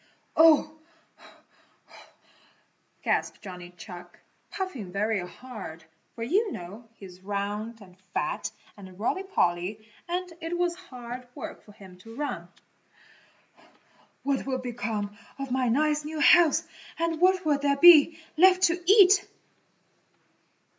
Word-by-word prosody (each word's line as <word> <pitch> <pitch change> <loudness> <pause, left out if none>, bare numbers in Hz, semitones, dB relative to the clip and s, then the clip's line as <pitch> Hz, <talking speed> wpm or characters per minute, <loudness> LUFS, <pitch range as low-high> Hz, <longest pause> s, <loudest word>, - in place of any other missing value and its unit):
"Oh," 315 -1 +5 2.2
gasped - - -1
Johnny 180 -3 -9
Chuck, 180 -1 -11 0.3
puffing 280 - -5
very 210 +2 0
hard, 195 -8 -10 0.3
for 230 - -5
you 390 - +1
know 205 - -9
he 200 - -12
is 180 -1 -14
round 205 +3 -4
and 185 -3 -15 0.2
fat - - -2 0.3
and 190 -2 -13
roly 240 - -1
poly 210 - -1 0.2
and 360 0 -3
it 330 +2 -3
was 350 -1 +1
hard 250 -8 -9
work - - -8
for 210 - -17
him 190 -3 -15
to 225 +4 -13
run, 250 -12 -4 1.8
"what 275 -1 -1
will 260 -1 -1
become 225 -5 -4 0.2
of 275 -2 -6
my 255 -1 +1
nice 300 +5 +1
new 310 +1 -5
house 330 +1 +5 0.3
and 330 0 -2
what 370 -1 +3
will 295 -2 +2
there 280 -1 +1
be 320 0 +8 0.2
left 370 +2 +5
to 350 0 +3
eat?" 400 -1 +6
255 Hz, 125 wpm, -27 LUFS, 205-330 Hz, 2.2 s, be